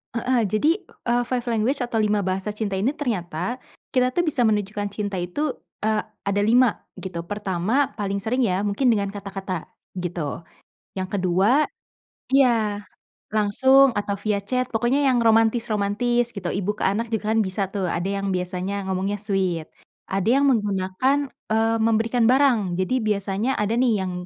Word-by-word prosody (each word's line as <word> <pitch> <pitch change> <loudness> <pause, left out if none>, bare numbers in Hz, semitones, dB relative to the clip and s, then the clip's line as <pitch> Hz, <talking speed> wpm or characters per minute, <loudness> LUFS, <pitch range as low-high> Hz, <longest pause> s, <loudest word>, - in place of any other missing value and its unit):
Heeh. 240 +1 +1
Jadi, 215 - +2 0.4
eee, 240 0 +2
five 250 -1 -1
language 240 +4 0
atau 240 -2 -1
5 210 -1 +1
bahasa 190 +3 -2
cinta 200 -3 -2
ini 255 +9 0
ternyata 225 - -3 0.3
kita 255 0 +2
tuh 350 - +3
bisa 275 -7 +1
menunjukkan 205 -1 -1
cinta 205 -2 -3
itu, 220 +13 -2 0.3
eee, 215 0 +1 0.2
ada 200 0 0
5, 235 +2 +4 0.2
gitu. 175 -3 -5
Pertama, 205 +6 0
paling 200 -1 -2
sering 250 +3 +1
ya 190 0 0
mungkin 205 +6 0
dengan 200 -4 +2
kata-kata, 195 -3 -5 0.3
gitu. 170 -3 -4 0.5
Yang 185 -1 -4
ke-2 195 - +3 0.7
iya. 225 -6 +3 0.5
Langsung 265 +6 +5
atau 205 -1 -1
via 210 -1 0
chat 250 +5 -2
pokoknya 240 +5 +1
yang 250 - +3
romantis-romantis 225 +1 +2
gitu, 200 -4 -8
ibu 200 +1 -1
ke - - -1
anak 220 +4 -1
juga 220 -1 0
kan 225 - +3
bisa 190 0 -2
tuh, 190 -3 -1
ada 170 +2 -2 0.2
yang 195 - -2
biasanya 185 +2 -3
ngomongnya 190 +2 -1
sweet. 190 -5 -1 0.4
Ada 195 +2 -1
yang 280 - +3
menggunakan, 210 +1 +1 0.3
eee, 225 +1 +2
memberikan 230 +1 +2
barang. 240 -9 +3
Jadi 245 +7 0
biasanya 210 +3 -1
ada 210 +1 0
nih 240 0 +3
yang 185 - -3
210 Hz, 155 wpm, -23 LUFS, 195-240 Hz, 0.7 s, Langsung